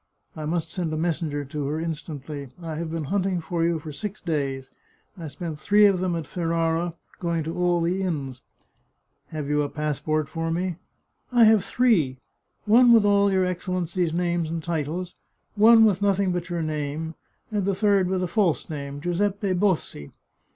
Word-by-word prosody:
I 155 - -5
must 165 0 -2
send 175 -4 -2
a 155 - -2
messenger 155 -3 -1
to 140 +1 -4
her 150 +2 -2
instantly. 150 -3 -5
I 165 -2 -5
have 160 +1 -4
been 165 -1 -3
hunt 190 +6 0
ing 185 -2 0
for 165 +1 -2
you 170 0 +2
for 155 0 -8
six 205 +8 -6
days; 140 -6 -3 0.4
I 170 -4 -7
spent 160 0 -6
three 210 +4 +5
of 195 -3 +4
them 180 -1 0
at 165 -2 -3
Ferrara, 165 0 -1 0.2
going 170 -2 -1
to 165 +2 -4
all 175 -1 +2
the 180 +3 0
inns." 140 -8 -3 0.4
" - - -48
Have 150 -2 -5
you 150 0 +1
a 145 - -1
passport 150 0 -1
for 165 +2 -3
me? 175 +1 -2 0.2
" - - -48
" - - -47
I 240 -2 +5
have 220 -3 +6
three. 190 - +2 0.5
One 235 +3 +6
with 225 -3 +6
all 200 0 +4
your 190 -1 +2
Excellency's 180 -1 -1
names 170 -1 0
and 165 0 -4
titles, 170 +2 -3 0.4
one 225 +1 +7
with 200 -3 +2
nothing 200 -1 +2
but 175 -1 -3
your 170 -1 -2
name, 155 +1 -3 0.4
and 210 -2 0
the 195 0 0
third 200 -2 +3
with 185 0 0
a - - 0
false 175 -3 0
name, 140 -1 -6
Giuseppe 195 +3 0
Bossi. 180 - -1
170 Hz, 190 wpm, -25 LUFS, 155-185 Hz, 0.5 s, one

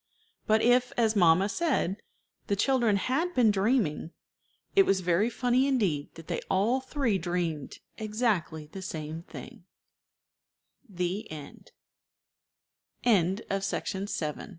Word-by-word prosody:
But 220 +1 +3
if, 245 +1 +4
as 225 -2 +2
mamma 180 0 +5
said, 245 - 0 0.5
the 200 - +1
children 240 -1 +2
had 280 - -1
been 235 -4 +5
dreaming, 200 - +1 0.7
it 395 - +8
was 195 - +1
very 180 +5 +2
funny 250 +2 +1
indeed 195 - 0
that 165 - -11
they - - -3
all 215 +7 +2
three 260 -7 -1
dreamed 170 -4 -3 0.2
exactly 210 -8 -1
the 190 +6 -9
same 160 -3 -5
thing. 175 - -11 1.2
THE 180 +2 -3
END. 150 -2 -10
200 Hz, 105 wpm, -28 LUFS, 175-245 Hz, 1.2 s, it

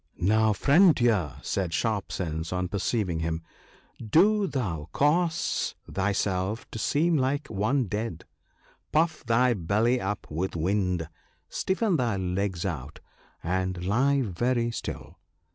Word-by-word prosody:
Now, 110 +4 +3
friend 155 - +5
Deer," 110 - +1
said 90 -4 -1
Sharp 110 -4 -1
sense 80 -2 -3
on 90 -1 -1
perceiving 100 -3 -1
him, 80 0 -2 0.3
" - - -33 0.2
do 210 +1 +4
thou 90 - -3
cause 165 +3 +1
thyself 100 +1 -1
to 115 - -5
seem 160 +7 +2
like 140 +2 0
one 110 +7 +1
dead: 105 -3 -4 0.7
puff 160 +2 +1
thy 120 +1 +3
belly 110 +6 +1
up 100 +1 -3
with 85 +5 -2
wind, 90 -1 0 0.4
stiffen 190 -1 0
thy 120 -6 0
legs 95 -1 -2
out, 75 -7 -5 0.4
and 90 0 -1
lie 135 +7 +2
very 120 +4 0
still. - - -7
105 Hz, 125 wpm, -27 LUFS, 90-130 Hz, 0.7 s, friend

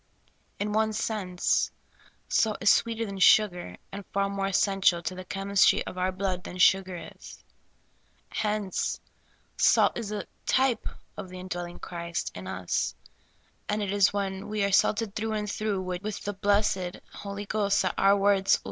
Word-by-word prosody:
In 210 +1 -1
one 220 0 +2
sense, 205 -5 0 0.6
salt 215 -2 +2
is 200 - +5
sweeter 230 0 +1
than 200 -2 -6
sugar, 180 - +4
and 200 +1 -6
far 200 0 0
more 195 -1 -1
essential 195 -3 +2
to 185 - -2
the 185 0 -7
chemistry 195 +1 +2
of - - -7
our 185 +1 0
blood 185 -1 -2
than 180 - -8
sugar 185 0 +4 0.2
is. - - -13 0.9
Hence, 210 -3 -1 0.6
salt - - +4
is 220 -3 -4
a 210 -1 -3 0.2
type 260 -2 +2 0.3
of 185 - -6
the 185 0 -8
indwelling 175 -1 -5
Christ 170 -1 -4
in 95 0 -8
us; 90 -1 -2 0.7
and 210 0 0
it 195 - -2
is 200 -1 +4
when 195 -1 -3
we 210 -1 -1
are 200 - +1
salted 210 +1 +2
through 220 +1 -2
and 210 -1 -2
through 205 -2 -2
with 185 +3 -4
the 205 - -3
blessed 195 -2 +1 0.2
Holy 200 0 -6
Ghost 200 -1 +1
that 185 - 0
our 195 +1 +4
words 195 -1 +4
will - - -16
200 Hz, 165 wpm, -27 LUFS, 185-210 Hz, 0.9 s, is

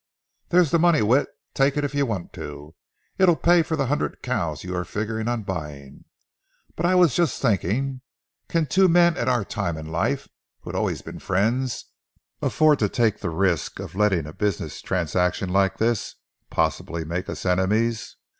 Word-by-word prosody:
"There's 175 -4 +4
the 170 - +3
money, 170 -8 +4
Whit; 125 +7 +3 0.3
take 135 +1 +2
it 145 - +1
if 145 0 -2
you 140 -1 +1
want 100 -7 -4
to. 75 +1 -8 0.5
It'll 180 -3 +5
pay 175 +1 +4
for 160 0 -2
the 140 -3 0
hundred 145 +4 -2
cows 85 - -2
you 90 0 -4
are 90 - -1
figuring 110 +4 -3
on 120 -2 -1
buying. 75 -7 -7 0.7
But 170 - 0
I 185 - +3
was 175 -6 +5
just 170 -7 +1
thinking: 130 +4 0 0.5
can 165 -2 +1
two 190 +5 +4
men 170 -1 +5
at 120 - -1
our 120 -5 +1
time 95 -7 -3
of 80 0 -7
life, 80 +1 -1 0.3
who - - -7
have - - -7
always - - -1
been - - -8
friends, 115 +6 0 0.6
afford 155 -2 +3
to 105 - +1
take 110 -2 +1
the 95 - -3
risk 85 -2 0
of - - -7
letting 95 -5 +2
a 75 - -8
business 105 -4 -2
transaction 90 +1 0
like 95 +1 +2
this 115 -1 0 0.3
possibly 85 -1 -1
make 85 +4 -4
us - - -6
enemies? 105 +5 +1
110 Hz, 180 wpm, -24 LUFS, 90-140 Hz, 0.7 s, It'll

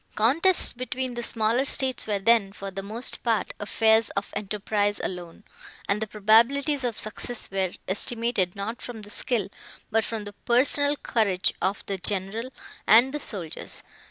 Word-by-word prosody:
Contests 325 - +4
between 255 +1 -4
the 240 - -4
smaller 230 +2 +1
states 265 -3 +1
were 210 -2 0
then, 200 0 +3
for 195 -1 -7
the 195 +1 -5
most 220 +5 -4
part, 225 -5 0
affairs 220 +1 +3
of 200 - -3
enterprise 205 0 -1
alone, 175 +1 -6 0.4
and 200 +2 0
the 220 - -1
probabilities 235 +8 +3
of 240 -3 -2
success 220 +1 -3
were 190 -2 0 0.2
estimated, 210 -2 0
not 210 +4 -5
from 225 -3 -8
the 205 - -11
skill, 220 -5 -1 0.4
but 225 0 +2
from 220 -1 -4
the 205 0 -9
personal 285 +6 +2
courage 200 -9 +1
of 195 +2 -1
the 195 -1 -3
general, 205 +6 -1 0.4
and 240 +6 +6
the 295 - -2
soldiers. 185 - -4
220 Hz, 155 wpm, -26 LUFS, 200-245 Hz, 0.4 s, and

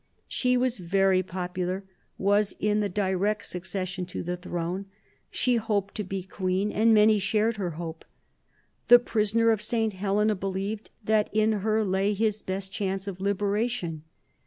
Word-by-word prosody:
She 250 -1 +1
was 250 -3 0
very 190 +1 +3
popular, 185 +1 -3 0.3
was 205 +1 +2
in 210 0 +1
the 205 -1 0
direct 200 +2 0
succession 185 0 -4
to 180 - -5
the 180 +1 -2
throne; 180 +2 -4 0.4
she 250 -2 +1
hoped 205 -3 -1
to 210 - -3
be 195 -1 -4
queen, 190 +2 -1
and 225 +2 +3
many 215 0 +6
shared 215 +3 +1
her 180 -4 -2
hope. 165 -1 -6 0.8
The 245 - +10
prisoner 230 -1 +2
of 220 -2 0
St. 220 0 0
Helena 205 +3 +1
believed 195 +2 -4
that 215 0 +2
in 215 +1 +3
her 220 +1 +2
lay 195 +2 +1
his 215 0 0
best 190 0 -4
chance 195 -1 -3
of 190 -1 -6
liberation. 200 -3 -1
200 Hz, 155 wpm, -27 LUFS, 185-215 Hz, 0.8 s, The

